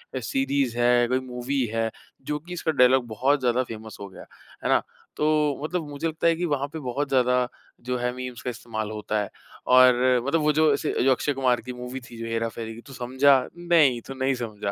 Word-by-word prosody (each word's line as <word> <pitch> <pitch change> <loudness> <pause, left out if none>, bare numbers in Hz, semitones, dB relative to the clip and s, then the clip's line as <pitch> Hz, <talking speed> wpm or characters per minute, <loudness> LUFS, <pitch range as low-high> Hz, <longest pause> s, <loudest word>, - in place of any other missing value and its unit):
अ, - - -1
series 135 0 -1
है, 120 0 +4
कोई 130 +2 +1
movie 130 +1 -2
है 115 0 0 0.4
जो 150 +2 -1
कि 175 +4 -10
इसका 165 -2 -1
डायलॉग 130 -2 +4
बहुत 130 +6 +1
ज़्यादा 125 -1 +1
फ़ैमस 110 -2 -9
हो 100 - -7
गया। - - -12 0.4
है - - -1
ना? - - +4 0.4
तो 150 - 0 0.4
मतलब 160 0 -2
मुझे 145 +3 -3
लगता 160 +1 0
है 165 - +4
कि 175 +2 -2
वहाँ 145 -4 -1
पे 160 - -4
बहुत 140 +1 -3
ज़्यादा 125 -1 +2 0.4
जो 125 0 -1
है, 125 0 -1
मीम्स 125 -1 -6
का 125 - -3
इस्तेमाल 110 -3 -5
होता 105 0 -2
है। 100 - -4 0.4
और 125 0 +7 0.3
मतलब 160 +3 +1
वो 150 0 +3
जो 155 -2 +5
ऐसे 145 +2 -1
जो 135 - +4
अक्षय 145 +3 +1
कुमार 130 -3 +1
की 125 +2 -7
मूवी 125 +1 -6
थी 120 - -11
जो 115 - -5
हेरा 115 0 -1
फेरी 115 0 -7
कि 115 - -11
तू 135 - -11
समझा 130 +3 +3 0.2
नहीं 165 -8 +3
तू 135 - -6
नहीं 135 0 0
समझा। 105 -4 -4
125 Hz, 225 wpm, -25 LUFS, 120-140 Hz, 0.4 s, और